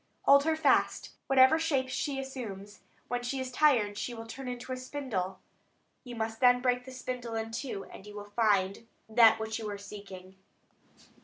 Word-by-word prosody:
Hold 280 +1 +6
her 320 0 +2
fast, 315 -3 +2 0.2
whatever 270 +4 +6
shapes 270 -5 0
she 275 -2 -2
assumes; 215 -7 -7 0.3
when 245 0 -2
she 245 +3 -3
is 260 -1 -4
tired 240 -8 +3
she 245 - -4
will 225 0 -8
turn 260 +3 -8
into 250 +1 -6
a 255 - -2
spindle; 255 -9 -4 0.7
you 245 -2 -8
must 225 0 -3
then 245 -1 +5
break 250 0 0
the 260 - -9
spindle 250 -2 -5
in 225 0 -3
two, 225 -4 -4
and 195 - -13
you 210 - -10
will 205 0 -7
find 205 -1 +1 0.2
that 220 0 +6
which 220 +1 -3
you 215 -2 -4
are 205 - -4
seeking." 195 -2 -11
240 Hz, 180 wpm, -30 LUFS, 210-260 Hz, 0.7 s, Hold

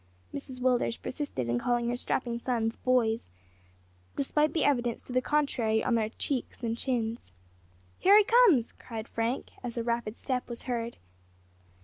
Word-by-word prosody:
Mrs 260 -2 -6
Willders 250 -2 +2
persisted 255 - -4
in 120 +1 +1
calling 240 - +1
her 240 - 0
strapping 240 -1 -1
sons 230 -2 -1
"boys," 235 -3 +1 0.9
despite 300 +2 +1
the 320 - +1
evidence 240 -5 +1
to 250 - -8
the 255 - +3
contrary 250 -7 +1
on 250 - +1
their 220 -2 +1
cheeks 255 +1 -3
and 230 -1 0
chins. 235 - -2 0.7
"Here 395 +3 +7
he 425 - +7
comes!" 410 - +5
cried 225 -2 -8
Frank, 230 +3 -2
as 240 -1 -5
a 235 - 0
rapid 235 -1 -2
step 255 -2 -2
was 235 - -6
heard. 235 -2 -3
240 Hz, 155 wpm, -29 LUFS, 230-260 Hz, 0.9 s, Here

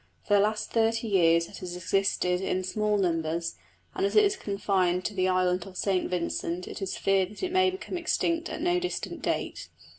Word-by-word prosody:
For 205 - -1
the 205 - +6
last 215 +1 0
thirty 225 0 +1
years 170 -4 +4
it - - -11
has 180 -1 -6
existed 180 0 0
in 185 -1 -1
small 210 +3 0
numbers; 165 -2 -1 0.4
and 385 - -2
as 400 - 0
it 425 - +7
is 400 -1 +2
confined 195 - 0
to 210 - -1
the 185 -1 +1
island 185 0 +1
of 185 -1 -10
St 190 -2 0
Vincent 175 0 -2
it - - -7
is 195 - -3
feared 195 -1 +2
that 210 - -10
it 365 - -1
may 375 0 +4
become 370 -1 -5
extinct 335 0 0
at 325 - -5
no 355 0 +2
distant 360 0 -4
date. - - -3
195 Hz, 205 wpm, -28 LUFS, 180-230 Hz, 0.4 s, it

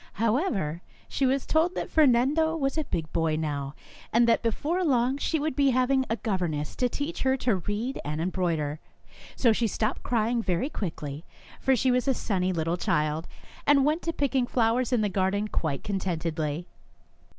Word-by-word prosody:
However, 215 - 0 0.3
she 270 - 0
was 265 +1 +1
told 335 +4 +2
that - - -4
Fernando 305 +3 +3
was 275 -3 -1
a 310 -2 -1
big 160 -8 -4
boy 165 -2 +1
now, 145 -2 -3 0.4
and 235 +1 +4
that 230 - +3
before 300 - 0
long 260 -3 +2
she 320 - 0
would 305 -2 -2
be 280 -1 +4
having 260 +1 +2
a 225 - 0
gov 200 -4 -1
erness 150 -4 -3
to 250 - +1
teach 295 +7 -4
her 265 0 +2
to 240 -6 +1
read 210 +8 -3
and 150 +2 -3
embroider, 165 -4 -1 0.6
so 235 -4 +4
she 230 +1 +1
stopped 220 +4 -1
crying 235 0 0
very 185 - -1
quickly, 155 - -5 0.4
for 265 - +3
she 255 +1 +2
was 250 +2 +1
a 265 - +3
sunny 185 -5 0
little 165 0 -1
child, 155 -1 0 0.4
and 280 -2 +5
went 310 +3 +1
to 335 - -1
picking 270 -5 0
flowers 240 +1 +1
in 245 -3 +2
the 210 - +2
garden 200 +2 0
quite 155 -8 -2
contentedly. 165 -5 -2
230 Hz, 180 wpm, -27 LUFS, 170-265 Hz, 0.6 s, and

